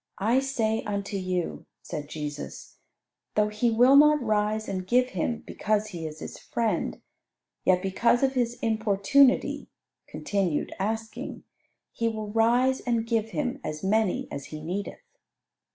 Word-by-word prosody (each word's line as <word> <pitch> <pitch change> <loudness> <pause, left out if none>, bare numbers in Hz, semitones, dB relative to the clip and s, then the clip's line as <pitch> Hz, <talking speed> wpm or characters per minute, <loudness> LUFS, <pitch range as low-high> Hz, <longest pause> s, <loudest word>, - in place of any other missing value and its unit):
I 225 +6 +3
say 230 -5 0
unto 200 0 -3
you," 185 -2 -3 0.2
said 150 -3 -6
Jesus, 150 -2 -7 0.6
"though 210 0 +3
he 215 +3 +1
will 245 +4 +5
not 300 +1 +7
rise 215 -2 0
and 185 -2 -4
give 250 +3 +3
him 225 +5 -2
because 215 0 -1
he 165 -2 -5
is 155 0 -9
his - - -7
friend, 210 - -1 0.7
yet 180 0 +3
because 235 +6 +2
of 270 0 +3
his 245 -2 0
importunity 220 +4 +3 0.4
(continued 190 -7 -1
asking) 220 +3 -4 0.5
he 230 - -1
will 215 -2 -5
rise 245 +4 +3
and 235 -2 -1
give 225 -1 0
him 255 -2 -3
as 155 0 -5
many 210 0 +1
as 140 - -5
he 155 - -8
needeth." 185 - -5
215 Hz, 140 wpm, -27 LUFS, 190-235 Hz, 0.7 s, not